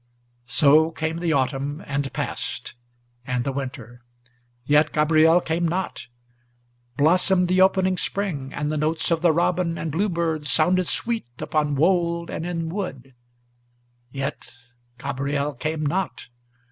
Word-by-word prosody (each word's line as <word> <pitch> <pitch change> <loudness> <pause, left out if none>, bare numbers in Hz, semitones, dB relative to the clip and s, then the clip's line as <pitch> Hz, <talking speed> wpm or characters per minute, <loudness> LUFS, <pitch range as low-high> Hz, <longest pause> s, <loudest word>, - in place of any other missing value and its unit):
So 155 +4 +5
came 160 0 -3
the 170 -1 0
autumn, 140 +2 -1
and 140 -1 -2
passed, - - -4 0.5
and 125 -1 -2
the 135 - -2
winter, 125 -3 -7 0.6
yet 150 +3 +3
Gabriel 155 +2 +4
came 170 0 -1
not; 180 -6 -3 0.9
Blossomed 180 +4 +3
the 185 +1 +3
opening 190 -1 +3
spring, 165 -12 -2
and 150 +1 -3
the 155 - -1
notes 160 +3 0
of 165 -1 +1
the 170 -1 +4
robin 170 +1 0
and 160 - -3
bluebird 165 -4 -1
Sounded 180 +5 +3
sweet 230 - 0
upon 150 -2 -1
wold 170 +2 +1
and 165 - -4
in 165 -2 -3
wood, 140 -9 -5 1.0
yet 135 +1 -5 0.5
Gabriel 140 +2 -2
came 155 +4 -3
not. 180 0 -2
160 Hz, 130 wpm, -23 LUFS, 140-175 Hz, 1.0 s, So